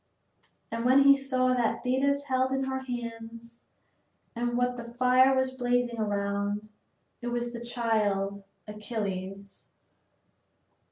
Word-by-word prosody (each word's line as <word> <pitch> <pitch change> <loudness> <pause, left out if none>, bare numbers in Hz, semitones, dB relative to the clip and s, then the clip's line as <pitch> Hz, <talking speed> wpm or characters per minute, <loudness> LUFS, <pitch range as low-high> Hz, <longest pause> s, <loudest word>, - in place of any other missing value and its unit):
And 230 +2 0
then 270 +2 +6
he 275 0 +8
saw 255 -2 +1
what 240 -3 0
Thetis 275 +3 +1
held 260 -2 0
in 270 0 0
her 265 0 -2
hands 235 -2 -7 0.7
and 240 +1 -1
what 245 0 +1
the 235 -1 -8
fire 255 +2 +5
was 260 0 +1
blazing 245 -2 0
around; 205 0 -1 0.5
it 240 - -5
was 240 0 -2
the 235 0 -6
child, 210 -5 -1 0.2
Achilles. 200 -2 -5
240 Hz, 120 wpm, -28 LUFS, 215-255 Hz, 0.7 s, he